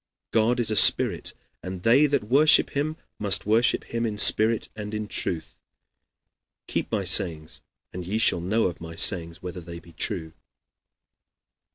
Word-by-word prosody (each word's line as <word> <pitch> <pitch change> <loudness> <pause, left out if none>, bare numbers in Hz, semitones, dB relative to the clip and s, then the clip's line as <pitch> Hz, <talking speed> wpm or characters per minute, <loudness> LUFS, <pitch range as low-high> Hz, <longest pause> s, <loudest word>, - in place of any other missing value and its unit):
God 115 +2 +1
is 115 -2 +1
a - - -1
spirit, - - +3 0.3
and 90 -1 -8
they 135 +6 +4
that 140 -6 -1
worship 140 +8 +4
him 155 +2 -3 0.2
must 100 -2 +1
worship 110 +3 +2
him 115 0 -4
in 110 -3 -3
spirit 110 +2 +3
and 105 0 -7
in 105 0 -4
truth. 80 -5 -3 1.1
Keep - - -4
my - - -1
sayings, 80 -2 0 0.3
and 90 - -6
ye 95 +5 -3
shall 100 -6 +1
know 105 +6 0
of 85 -3 -4
my 85 0 -9
sayings 85 -1 +1
whether 90 0 -7
they 85 0 -10
be 85 0 -15
true." 80 -5 -4
105 Hz, 160 wpm, -24 LUFS, 85-115 Hz, 1.1 s, they